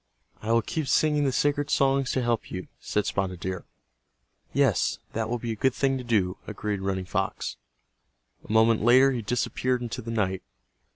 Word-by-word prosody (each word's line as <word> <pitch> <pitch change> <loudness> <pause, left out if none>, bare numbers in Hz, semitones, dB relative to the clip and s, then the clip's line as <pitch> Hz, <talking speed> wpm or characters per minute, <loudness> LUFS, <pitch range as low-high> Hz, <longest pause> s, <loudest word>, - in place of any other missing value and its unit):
"I 110 - -2
will 115 -1 +4
keep 155 +5 -3
singing 150 +1 +3
the 135 - +2
sacred 145 +2 +1
songs 135 -1 +2
to 130 - 0
help 120 -2 -1
you," 90 -1 -6
said 105 - -1
Spotted 95 -2 -2
Deer. 95 -1 -4 0.9
"Yes, - - +2 0.2
that 110 0 -2
will 120 - 0
be 115 0 -4
a - - -2
good 130 +4 +1
thing 135 -1 +1
to - - -6
do," 100 -6 +1
agreed 105 -2 -3
Running 95 -1 -2
Fox. 95 -9 -2 0.9
A - - -8
moment 110 0 +4
later 130 +4 +6
he 125 -3 -2
disappeared 125 +3 0
into 120 - -4
the 115 - -7
night. 95 -5 -1
115 Hz, 180 wpm, -26 LUFS, 100-130 Hz, 0.9 s, later